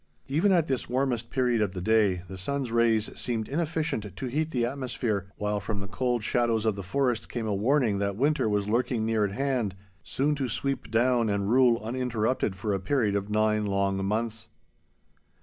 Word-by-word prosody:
Even 160 +9 +2
at 170 -4 +4
this 130 -4 -2
warmest 125 -2 0
period 125 -4 +1
of 100 -3 0
the 95 - -4
day 100 -2 +2
the 95 - -8
sun's 130 +6 -3
rays 115 -2 +2
seemed 115 -3 -2
inefficient 150 - -2
to 130 - -5
heat 150 +5 -1
the 125 -6 0
atmosphere, 120 -6 -2
while 105 0 -1
from 100 0 -4
the 100 - -5
cold 120 +1 -1
shadows 115 -2 +1
of 110 -2 +2
the 100 - -5
forest 120 +5 -1
came 120 -2 -3
a 105 - 0
warning 110 0 +2
that 100 -1 -1
winter 140 0 +1
was 105 -1 0
lurking 120 0 0
near 110 -1 +1
at 100 - -3
hand, 125 -6 -1 0.3
soon 145 +3 0
to 135 -3 -2
sweep 135 +5 -2
down 120 0 +2
and 100 0 0
rule 125 -2 +5
uninterrupted 115 -3 -1
for 100 +2 -2
a 95 - 0
period 105 +1 +1
of 100 0 -2
nine 105 0 +2
long 100 -1 0
months. 110 +2 -2
115 Hz, 190 wpm, -27 LUFS, 105-130 Hz, 0.3 s, rule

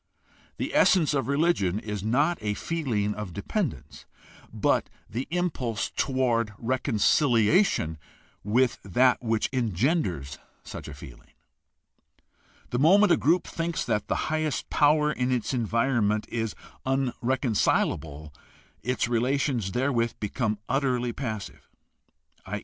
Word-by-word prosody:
The - - -3
essence 165 -6 +4
of 135 -2 0
religion 140 - +1
is 105 -2 -4
not 145 +10 +1
a 105 -1 -1
feeling 115 -10 -1
of 105 -5 -6
dependence, 160 - -4 0.4
but - - +1 0.2
the 120 +5 -4
impulse 150 - -2
toward 120 -5 0
reconciliation 120 - +2 0.4
with 120 +5 +2
that 125 +6 +3
which 115 -2 0
engenders 105 - -1 0.2
such - - -8
a 75 - -8
feeling. - - -13 1.4
The 120 - 0
moment 195 +8 +5
a - - +7
group 170 +4 +2
thinks 165 0 -3
that 105 - -1
the - - 0 0.2
highest 155 -3 -2
power 150 0 +4
in 125 -3 -1
its 125 +1 -1
environment 115 -2 +1
is 115 -2 -3 0.3
unreconcilable 120 - 0 0.5
its 125 -1 -1
relations 120 -2 0
therewith 120 -1 0
become 105 +1 -1
utterly 125 -3 0
passive, 110 -6 -6 0.7
i. 105 +3 -4
125 Hz, 115 wpm, -26 LUFS, 105-140 Hz, 1.4 s, a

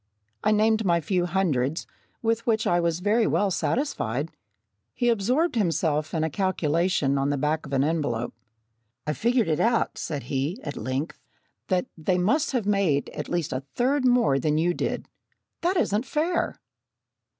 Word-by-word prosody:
I - - +3
named 220 +1 +3
my 170 -3 +3
few 175 +2 0
hundreds, 160 -6 0 0.4
with 230 +1 0
which 220 -1 +2
I 175 - +3
was 170 0 0
very 215 +3 +3
well 205 -1 +1
satisfied. 160 - -1 0.6
He 240 - +2
absorbed 250 - +2
himself 160 - 0
in 160 - +1
a 160 - 0
calculation 165 -4 +1
on 135 +1 +1
the 145 - 0
back 150 +2 -1
of 140 - -8
an 135 0 +3
envelope. 145 -7 -1 0.7
"I 150 - 0
figure 215 - +1
out," 230 +2 +1
said 145 -4 -4
he, 140 - -2
at 145 - -5
length, 130 +7 -3 0.5
"that 185 -2 +1
they 180 +3 0
must 270 - +2
have 245 -6 -1
made 195 -9 +1
at 150 - -6
least 175 -3 -1
a 130 - -2
third 265 +3 +2
more 245 - +4
than 150 +2 +1
you 175 +3 +2
did. - - -3 0.5
That 360 +3 +1
isn't 225 - +1
fair!" 335 +3 -1
175 Hz, 160 wpm, -26 LUFS, 150-225 Hz, 0.7 s, more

